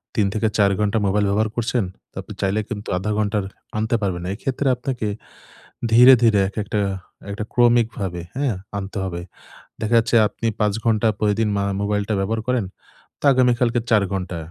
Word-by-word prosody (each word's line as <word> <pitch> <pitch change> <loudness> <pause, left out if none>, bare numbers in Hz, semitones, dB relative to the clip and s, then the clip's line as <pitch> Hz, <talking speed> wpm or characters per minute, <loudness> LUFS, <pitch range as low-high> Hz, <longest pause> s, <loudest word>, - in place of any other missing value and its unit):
৩ 105 - +3
থেকে 110 0 +1
৪ 100 -2 +4
ঘণ্টা 105 +1 +1
মোবাইল 105 +1 +2
ব্যবহার 110 +2 +1
করছেন। 120 0 0 0.3
তো - - -38
আপনি - - -10
চাইলে 100 +2 +1
কিন্তু 105 -3 -5
১/২ 105 +3 -2
ঘন্টার 105 -1 0 0.3
আনতে 110 +2 0
পারবেন 95 -4 -2
না। 90 - -3
এক্ষেত্রে 135 +4 -2
আপনাকে 125 -3 -3 0.9
ধীরে, 125 +3 +9
ধীরে 110 -3 +5
একেকটা 105 0 -3 0.5
একটা 105 +1 -4
ক্রমিকভাবে, 115 -7 +2
হ্যাঁ? 135 -7 0 0.2
আনতে 100 +1 -5
হবে। 85 -2 -4 0.6
দেখা 110 +2 +1
যাচ্ছে 115 +1 0
আপনি 115 - -4
৫ 105 -2 +2
ঘন্টা 110 0 +2
প্রতিদিন 105 +1 +1
মা 100 - 0 0.2
মোবাইলটা 105 +1 -1
ব্যবহার 110 +3 -1
করেন 125 -5 +1 0.6
তো - - -3
আগামীকালকে 125 -1 +2
৪ 105 -3 +5
ঘন্টা। 90 -2 -3
110 Hz, 165 wpm, -21 LUFS, 100-120 Hz, 0.9 s, ধীরে